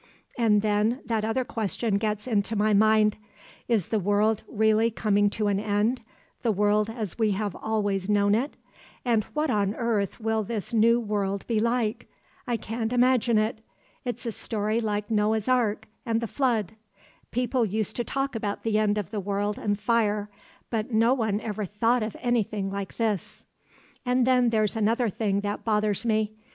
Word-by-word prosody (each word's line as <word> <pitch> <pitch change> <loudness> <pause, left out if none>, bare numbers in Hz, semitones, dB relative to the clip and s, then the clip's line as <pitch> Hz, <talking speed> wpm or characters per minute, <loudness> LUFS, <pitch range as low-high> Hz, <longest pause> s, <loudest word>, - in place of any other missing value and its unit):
And 215 -3 +3
then 215 +4 +1
that 225 -2 -1
other 230 +4 0
question 220 -1 -1
gets 210 -1 -2
into 220 -2 0
my 210 +1 +2
mind—is 215 0 +1
the 220 - +1
world 205 +2 +2
really 220 +1 +3
coming 205 -2 +2
to 215 +1 -2
an 200 -1 +1
end, 215 +4 0 0.4
the 235 - +2
world 210 +1 +2
as 225 -4 -5
we 215 -2 +3
have 205 0 -2
always 205 -3 -1
known 205 -1 +3
it; 255 +7 -1 0.5
and 225 -4 +2
what 300 -2 +1
on 205 -1 +1
earth 220 -5 -1
will 220 0 0
this 215 +1 -5
new 230 +1 +4
world 200 -3 -2
be 230 -2 0
like? 230 -1 0 0.4
I 240 -1 0
can't 225 +1 -3
imagine 245 -2 +3
it; 215 +1 0 0.4
it's 245 -2 -4
a 230 - -1
story 215 +1 -2
like 210 -1 -2
Noah's 215 0 +1
Ark 220 -4 +1 0.2
and 230 -2 0
the 230 - -2
Flood. 230 -5 0 0.6
People 250 +1 0
used 215 -1 -2
to 240 - 0
talk 275 +3 -2
about 210 -3 -3
the 215 -1 +1
end 210 -1 +2
of 205 -2 -3
the 215 - -2
world 205 +1 -2
and 205 -1 -1
fire, 210 -3 +1 0.4
but 225 +1 -2
no 230 +3 +4
one 220 -5 0
ever 215 -1 -3
thought 225 +5 +1
of 215 0 -4
anything 215 -5 0
like 200 -1 -5
this. 220 -5 -2 0.6
"And 250 0 +2
then 250 -2 +4
there's 215 -2 +1
another 225 +2 +1
thing 200 -1 0
that 205 0 -3
bothers 210 -1 0
me. 215 -2 +1
215 Hz, 170 wpm, -26 LUFS, 205-230 Hz, 0.6 s, new